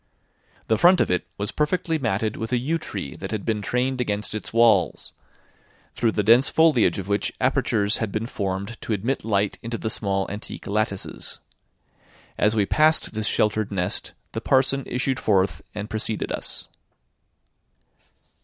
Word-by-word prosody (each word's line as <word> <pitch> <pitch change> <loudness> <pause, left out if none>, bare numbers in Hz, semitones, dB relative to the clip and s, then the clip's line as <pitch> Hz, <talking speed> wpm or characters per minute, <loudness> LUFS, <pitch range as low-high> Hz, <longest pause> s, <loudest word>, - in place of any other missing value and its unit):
The 110 - +1
front 175 +2 +6
of - - +2
it 90 0 0
was 100 +1 -2
perfectly 160 +1 0
matted 110 -3 -1
with 110 0 -5
a 125 - +3
yew 155 +7 -1
tree 90 - -5
that - - -6
had 110 -2 -4
been 110 -2 0
trained 125 +4 0
against 105 -3 -2
its 110 - -5
walls, 115 0 +3 0.8
through 115 -2 +1
the 105 - 0
dense 120 +6 +6
foliage 150 - +4
of 95 -1 -5
which 100 0 0
apertures 105 -1 +1
had 110 -3 -2
been 110 +2 -2
formed 100 0 -4
to 110 - -2
admit 115 +7 -1
light 100 -2 0
into 115 0 -4
the 110 - -3
small 95 -2 0
antique 105 +1 -7
lattices. 100 -1 -2 1.0
As 105 +1 +2
we 105 -2 +3
passed 155 +4 +3
this 110 0 0
sheltered 105 -1 +1
nest, 90 -3 -1 0.2
the - - -4
parson 135 +1 +2
issued 130 +1 -1
forth 95 -2 +1
and 105 0 -4
preceded 110 0 -2
us. - - -4
110 Hz, 160 wpm, -24 LUFS, 100-125 Hz, 1.0 s, front